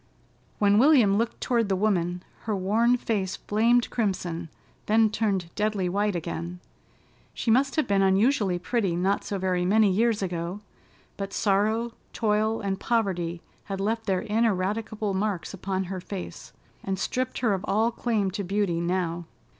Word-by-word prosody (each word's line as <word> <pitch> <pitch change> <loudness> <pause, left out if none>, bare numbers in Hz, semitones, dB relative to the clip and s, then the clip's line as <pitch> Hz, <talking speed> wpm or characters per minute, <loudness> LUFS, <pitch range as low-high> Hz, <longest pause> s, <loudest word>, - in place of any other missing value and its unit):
When 205 0 +4
William 250 -7 +5
looked 230 0 -2
toward 230 -4 +1
the 190 - +2
woman 180 -3 0 0.2
her 215 -2 0
worn 220 +6 +2
face 200 -6 -2
flamed 230 +3 +2
crimson, 175 -7 -2 0.4
then 220 0 +4
turned 195 -6 -1
deadly 210 -3 0
white 205 +1 0
again. 170 +1 -4 0.8
She 230 - 0
must 265 +3 +3
have 310 - +1
been 200 -1 +2
unusually 195 0 +3
pretty 195 -1 -1
not 190 +3 +1
so 200 - -3
very 185 -1 0
many 205 +2 +4
years 220 +1 +2
ago, 175 +2 -3 0.6
but 195 0 -5
sorrow, 220 +3 +1 0.2
toil 215 0 +1
and 195 -2 -2
poverty 175 -7 -1 0.2
had 195 -1 -4
left 225 +3 -1
their 190 -2 +1
ineradicable 215 0 0
marks 195 -2 -2
upon 190 0 -2
her 185 0 -5
face 190 0 -7 0.3
and 195 0 -2
stripped 255 +6 -2
her 225 -5 +2
of 190 0 -3
all 220 +3 +2
claim 220 -5 0
to 200 +2 -3
beauty 195 -2 0
now. 175 -1 -1
200 Hz, 155 wpm, -26 LUFS, 185-220 Hz, 0.8 s, William